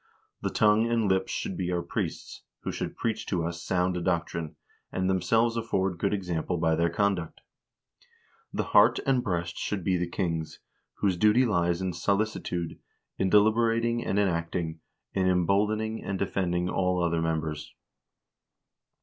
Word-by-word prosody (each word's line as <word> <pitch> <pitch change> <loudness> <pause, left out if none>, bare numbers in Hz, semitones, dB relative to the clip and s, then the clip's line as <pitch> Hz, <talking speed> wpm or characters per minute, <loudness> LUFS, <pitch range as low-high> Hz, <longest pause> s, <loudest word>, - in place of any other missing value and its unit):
The - - -1
tongue 105 +2 +3
and 115 -2 +2
lips 95 0 +1
should - - -3
be 90 -1 -2
our 85 -1 -1
priests, - - -4 0.2
who - - -3
should - - -4
preach 110 -1 -2
to 85 -4 0
us 85 0 -4
sound 90 -1 0
doctrine, 85 -3 -2 0.4
and 95 0 -1
themselves 110 +6 +2
afford 95 -6 -1
good 100 - +1
example 90 -3 -2
by 80 -1 +2
their 85 +1 +2
conduct. 90 -2 -1 1.1
The - - -1
heart - - +6
and 130 -2 +2
breast 85 -2 -2
should 100 -4 -2
be 95 0 +2
the 90 0 -2
kings, 85 -4 -3 0.4
whose 95 -3 0
duty 110 +7 +4
lies 85 -4 +1
in 95 -1 -1
solicitude, 95 -2 -1 0.4
in 95 - +2
deliberat 115 +3 +4
ing 120 0 0
and 95 - -1
in 100 -1 +4
acting, 85 -2 -2 0.3
in 95 -1 +1
emboldening 105 +5 +1
and 95 0 -2
defending 90 -2 -1
all 90 -1 +1
other 85 -1 +1
members. 80 -2 -2
95 Hz, 155 wpm, -28 LUFS, 85-105 Hz, 1.1 s, heart